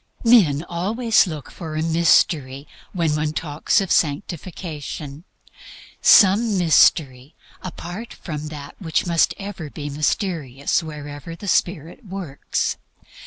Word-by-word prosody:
Men 175 - +5
always 210 +7 +1
look 155 -4 -7
for 160 -3 -7
a 155 - -1
mystery 155 -4 +2 0.2
when 165 -4 0
one 150 0 -1
talks 155 +4 0
of 190 - -4
sanctification, 155 -2 -3 0.8
some 205 +1 +6
mystery 150 -5 +3 0.3
apart 185 +5 -7
from 150 -3 -6
that 145 -2 -9
which 165 -4 -1
must 170 -2 +2
ever 195 -6 -7
be 145 0 -6
mysterious 150 - -1
wherever 150 +1 -8
Spirit 175 - -1
works. 185 -8 -3
160 Hz, 110 wpm, -21 LUFS, 145-185 Hz, 0.8 s, some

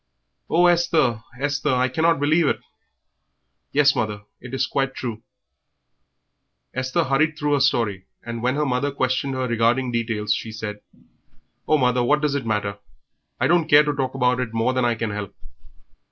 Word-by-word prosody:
"Oh, 175 +2 +4
Esther, 165 -9 +2 0.2
Esther, 140 -1 0
I 125 +1 +2
cannot 160 +5 +1
believe 155 +2 +3
it!" - - 0 1.1
"Yes, 140 -1 +4
mother, 105 -4 -2 0.2
it 125 - -10
is 135 0 0
quite 135 0 -2
true." 115 -4 -5 1.5
Esther 130 0 0
hurried 150 +3 +1
through 150 -1 0
her 145 - +3
story, 115 -8 0 0.2
and 115 -1 -6
when 125 +2 0
her 150 +1 0
mother 130 +1 0
questioned 135 0 -1
her 130 -1 -1
regarding 120 +2 +1
details 110 -3 -1
she 110 - -5
said 105 -1 -6 0.9
"Oh, 155 - +4
mother, 125 -2 +2
what 150 +5 +3
does 150 -2 0
it 140 -5 -3
matter? 105 -2 -2 0.6
I - - +2
don't 170 -2 +2
care 145 +1 +7
to 150 -1 -1
talk 135 -2 -2
about 125 -1 +2
it 115 -3 -3
more 115 +3 +1
than 130 -1 +1
I 120 -1 +1
can 110 -1 -3
help." 100 -1 -6
130 Hz, 170 wpm, -22 LUFS, 115-145 Hz, 1.5 s, care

